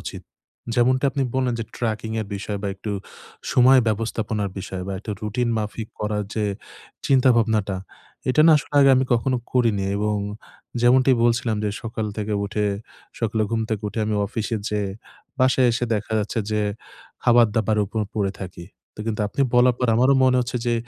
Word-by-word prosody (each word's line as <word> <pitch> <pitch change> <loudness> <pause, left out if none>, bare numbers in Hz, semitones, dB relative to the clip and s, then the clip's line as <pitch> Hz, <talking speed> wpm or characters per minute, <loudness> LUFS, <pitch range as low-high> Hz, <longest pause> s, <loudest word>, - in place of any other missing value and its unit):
উচিত। - - -7 0.5
যেমনটা 130 +3 +3
আপনি 140 - -1
বললেন 130 -2 +1
যে - - -2
ট্র্যাকিং-এর 110 -1 -2
বিষয় 100 +1 -4
বা 100 - -1
একটু 100 +2 -5 0.6
সময় 130 +1 +6
ব্যবস্থাপনার 110 -1 -2
বিষয় 95 -1 -5
বা 100 - -3
একটু 105 - -7
রুটিন 120 +3 -1
মাফিক 105 +1 -4
করার 105 0 -1
যে 110 - 0 0.6
চিন্তাভাবনাটা, 115 -6 +3 0.5
এটা 140 +4 +3
না 160 - +8
আসলে 145 - -5
আগে 135 -1 +7
আমি 130 - +2
কখনো 125 +2 +1 0.2
করিনি। 115 -6 +2
এবং 105 0 0 0.6
যেমনটি 130 +2 +5
বলছিলাম 115 -2 +1
যে 105 - 0
সকাল 110 -1 -3
থেকে 105 0 -3
উঠে, 105 0 -1 0.5
সকালে 110 -1 0
ঘুম 115 -1 0
থেকে 110 -1 -2
উঠে 110 - -6
আমি 110 - 0
অফিসে 110 +1 -3
যেয়ে, 105 -2 -1 0.5
বাসায় 130 0 +4
এসে 120 +1 0
দেখা 105 +1 -4
যাচ্ছে 105 +2 -2
যে 105 0 +1 0.6
খাবার-দাবারের 110 -3 +3
উপর 110 +3 -3 0.2
পড়ে 100 -2 0
থাকি। 90 -2 -8 0.3
তো - - -7
কিন্তু 110 -1 -2
আপনি 140 - -4
বলার 125 0 +5
পর 125 - +1
আমারও 130 +3 +4
মনে 130 0 +4
হচ্ছে 125 +1 -3
যে 120 - +2
110 Hz, 165 wpm, -23 LUFS, 105-125 Hz, 0.6 s, না